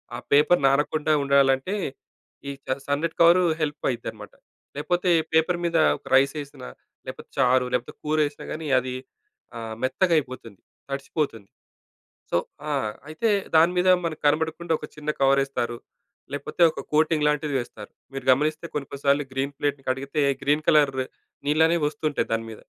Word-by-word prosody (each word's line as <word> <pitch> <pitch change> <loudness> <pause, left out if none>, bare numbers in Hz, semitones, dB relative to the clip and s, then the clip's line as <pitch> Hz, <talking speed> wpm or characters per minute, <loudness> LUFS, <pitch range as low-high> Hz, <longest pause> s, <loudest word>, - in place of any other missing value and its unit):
ఆ - - -4 0.2
పేపర్ 150 +4 +5
నానకుండా 150 +3 +1
ఉండాలంటే, 140 +5 +3 0.7
ఈ - - -2 0.2
చ 130 - 0
సన్నటి 150 +3 -1
కవరు 170 +2 +6 0.2
హెల్ప్ 145 -1 -2
అయిద్దనమాట. 110 -3 -7 0.4
లేకపోతే, 175 +4 0 0.2
పేపర్ 160 +2 +2
మీద 170 -1 +1 0.2
ఒక - - -18
రైస్ 135 +2 +4
వేసినా, 140 - -9 0.4
లేకపోతే - - -8
చారు, 130 -1 +4
లేకపోతే 125 -1 -2
కూర 155 +1 0
వేసినా 145 0 -7
కాని 155 0 -6
అది 125 0 -5 0.6
ఆహ్, 110 -1 -6
మెత్తగా 165 +8 +1
అయిపోతుంది, 125 -7 -10 0.3
తడిచిపోతుంది. 135 - -3 0.8
సో - - +3 0.3
ఆ! - - -1 0.4
అయితే 160 +9 -1 0.3
దాని 165 +2 +5
మీద 185 +1 +3 0.2
మనకు 160 -2 -4
కనపడకుండా 160 +3 0
ఒక - - -6
చిన్న 150 0 -6
కవరేస్తారు. 135 -3 +1 0.5
లేకపోతే, 145 +4 -5
ఒక - - -8
కోటింగ్ 155 0 +2
లాంటిది 150 0 0
వేస్తారు. 110 -4 -7 0.2
మీరు 135 - -6
గమనిస్తే 150 +5 +2
కొన్ని, 140 -2 -3
కొన్ని 140 - -7
సార్లు 140 +1 +3
గ్రీన్ 135 +1 -1
ప్లేట్‌ని 145 -1 -2
కడిగితే 135 +3 -1 0.2
గ్రీన్ 145 +2 +1
కలర్ 150 -2 +5 0.5
నీళ్ళనేవి 160 +3 +3
వస్తుంటాయి 150 0 -2
దాని 115 0 -1
మీద. 110 - -10
145 Hz, 150 wpm, -24 LUFS, 135-155 Hz, 0.8 s, కవరు